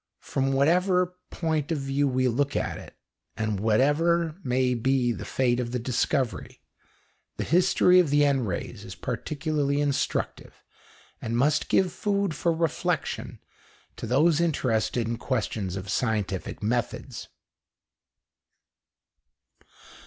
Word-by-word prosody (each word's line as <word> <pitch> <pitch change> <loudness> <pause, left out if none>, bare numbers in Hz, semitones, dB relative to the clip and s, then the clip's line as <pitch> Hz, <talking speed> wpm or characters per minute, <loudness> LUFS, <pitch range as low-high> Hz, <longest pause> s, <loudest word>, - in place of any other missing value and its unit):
From 135 0 -1
whatever 180 +6 +2 0.2
point 160 -2 -2
of 160 - +1
view 135 +1 0
we 130 -1 +1
look 140 +4 0
at - - -2
it, - - -13 0.4
and 110 -2 -1
whatever 150 - +2
may 125 0 +1
be 125 +1 +1
the - - -5
fate 125 -2 +1
of 120 -1 -3
the - - +1
discovery, 125 +1 -1 0.8
the - - -1
history 180 +1 +4
of 175 -5 +3
the 145 +1 +4
N 135 -3 +2
rays 95 -6 -4
is - - -9
particularly 145 -2 -2
instructive, 145 -2 -2 0.6
and 115 0 -2
must 145 +4 +2
give 185 -2 +2
food 200 -4 0
for 170 +3 0
reflection 165 +1 -2 0.6
to - - -6
those 155 +6 +3
interested 125 -7 0
in 115 0 -2
questions 110 -7 -2
of 95 0 -6
scientific 105 -3 -2
methods. 120 +3 -2
135 Hz, 125 wpm, -26 LUFS, 120-160 Hz, 0.8 s, history